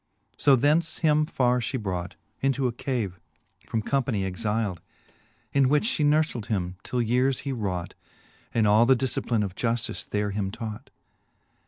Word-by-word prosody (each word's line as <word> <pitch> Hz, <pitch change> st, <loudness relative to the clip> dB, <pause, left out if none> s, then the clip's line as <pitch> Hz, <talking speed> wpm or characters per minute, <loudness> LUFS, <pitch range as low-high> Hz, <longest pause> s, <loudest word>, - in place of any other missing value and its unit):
So 140 Hz, -, +5 dB
thence 150 Hz, +6 st, +2 dB
him 150 Hz, 0 st, +4 dB
farre 125 Hz, -5 st, +2 dB
fhe 120 Hz, +2 st, -2 dB
brought 90 Hz, -5 st, -4 dB, 0.3 s
Into 135 Hz, 0 st, +1 dB
a 125 Hz, -, +2 dB
cave 115 Hz, -8 st, -3 dB, 0.5 s
from 110 Hz, -1 st, -1 dB
companie 125 Hz, -7 st, 0 dB
exilde, 105 Hz, -1 st, -2 dB, 0.7 s
In 135 Hz, -2 st, +4 dB
which 150 Hz, +1 st, +3 dB
fhe 230 Hz, -11 st, 0 dB
nourfled 150 Hz, -7 st, +2 dB
him, 90 Hz, -4 st, -2 dB
till 125 Hz, +2 st, -1 dB
yeares 125 Hz, +3 st, +1 dB
he 140 Hz, -, -3 dB
raught, 95 Hz, -8 st, -3 dB, 0.6 s
And 115 Hz, -2 st, +2 dB
all 110 Hz, +3 st, +5 dB
the 130 Hz, -, +6 dB
difcipline 120 Hz, -3 st, 0 dB
of 95 Hz, -3 st, -4 dB
juftice 115 Hz, +3 st, -2 dB
there 105 Hz, 0 st, -1 dB
him 100 Hz, -1 st, -2 dB
taught. 110 Hz, 0 st, -7 dB
115 Hz, 155 wpm, -26 LUFS, 105-135 Hz, 0.7 s, the